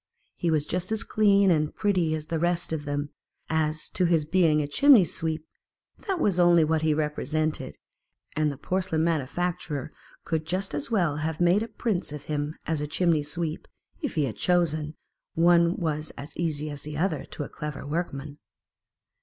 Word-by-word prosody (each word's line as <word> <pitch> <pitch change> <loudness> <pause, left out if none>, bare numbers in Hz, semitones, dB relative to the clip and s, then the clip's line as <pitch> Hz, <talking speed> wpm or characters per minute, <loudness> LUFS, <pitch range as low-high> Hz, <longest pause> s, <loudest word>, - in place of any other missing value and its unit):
He 170 - -1
was 155 -2 +1
just 180 +4 -3
as 220 0 0
clean 200 -3 +4
and 155 -2 +1
pretty 180 -6 +1
as 155 -1 -5
the 165 +1 -2
rest 175 0 0
of 150 -2 -3
them; 145 0 -3 0.4
as. 155 -1 0
to 185 - +1
his 165 -3 +2
being 165 -2 +3
a 150 - +2
106 145 - -5
chimney 280 -9 +8
sweep, 160 0 -3 0.6
that 385 -3 0
was 190 - +1
only 175 -2 +6
what 155 0 +1
he 160 -1 +2
re 150 0 +1
presented: 155 +1 -2 0.6
and 155 0 +1
the 140 - -8
porcelain 180 0 -1
manufacturer 160 -1 -2 0.3
could 160 -1 -2
just 185 +1 -2
as 145 -1 -2
well 175 -10 +1
have 155 0 -2
made 175 +4 +4
a 225 - -2
prince 215 -7 -2
of 150 -1 -7
him 150 +1 -3
as 160 -3 -1
a 150 - -2
chimney 165 0 +2
sweep, 155 +2 -4 0.3
if 290 - -3
he 150 -3 +2
had 115 - -5
chosen; 155 -4 +1 0.4
one 170 +1 +4
was 155 -3 -2
as 145 +3 -9
easy 155 -3 -2
as 145 -1 -7
the 150 0 -6
other, 160 -3 0
to - - -6
a - - -6
clever 150 -2 -6
workman. 145 -2 -4
160 Hz, 185 wpm, -27 LUFS, 150-175 Hz, 0.6 s, chimney